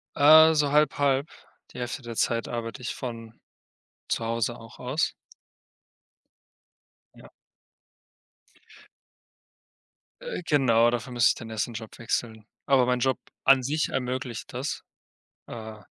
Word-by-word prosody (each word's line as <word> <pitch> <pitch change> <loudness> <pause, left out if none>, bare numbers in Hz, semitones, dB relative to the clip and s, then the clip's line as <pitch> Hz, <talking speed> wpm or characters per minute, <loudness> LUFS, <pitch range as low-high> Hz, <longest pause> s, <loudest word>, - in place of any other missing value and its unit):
Äh, 160 +2 +8
so 145 -2 +2
halb 150 -1 +3
halb. 140 0 +1 0.4
Die - - -9
Hälfte 125 +3 -4
der 120 -2 -8
Zeit 115 -1 0
arbeite 120 +2 -5
ich 120 - -4
von 115 -3 -7 0.7
zu - - -1
Hause 115 +1 -1
auch 115 -1 -14
aus. 130 +5 -1 2.0
Ja. - - -15 2.9
Äh, - - -5
genau, 120 -6 +4
dafür 120 +1 -4
müsste 120 -1 +4
ich - - +1
dann 115 - -9
erst 110 -4 -1
den 120 - -9
Job 110 -1 -8
wechseln. 110 -1 -3 0.2
Aber 135 -2 +4
mein 125 0 +1
Job 130 +1 +1 0.3
an 135 -1 +5
sich 150 +4 0
ermöglicht 125 -2 -4
das, 130 +4 -4 0.6
äh, 110 -2 -8
125 Hz, 130 wpm, -26 LUFS, 115-140 Hz, 2.9 s, Äh